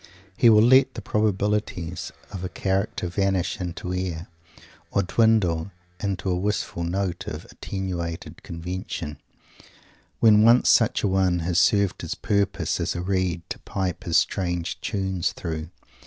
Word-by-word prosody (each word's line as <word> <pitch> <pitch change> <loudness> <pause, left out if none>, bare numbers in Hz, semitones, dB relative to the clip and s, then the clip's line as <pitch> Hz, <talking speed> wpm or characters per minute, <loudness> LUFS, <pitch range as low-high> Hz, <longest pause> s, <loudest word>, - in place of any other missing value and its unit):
He 120 - +6
will 105 -1 +7
let 130 +3 +5
the 115 - -5
probabilities 105 -4 -1 0.2
of 95 -2 -6
a 95 - -3
character 95 0 -1
vanish 95 +2 0
into 90 +1 -4
air, 90 -2 -3 0.6
or 100 - +1
dwindle 90 -4 +2 0.3
into 95 -1 -2
a - - +1
wistful 95 -2 -2
note 90 0 -2
of - - -6
attenuated 85 -4 -5
convention, 85 -3 -5 1.0
when 105 -2 +6
once 115 +3 +6
such 115 - +3
a - - +3
one 95 -2 +2
has 85 0 +2
served 100 +2 +3
his - - -4
purpose 100 -1 0
as - - -1
a 85 - -2
reed 90 -2 -1
to - - -5
pipe 95 -3 -3
his 85 - +3
strange 90 -2 -1
tunes 95 -3 -1
through. 80 -1 -5
95 Hz, 140 wpm, -25 LUFS, 85-100 Hz, 1.0 s, will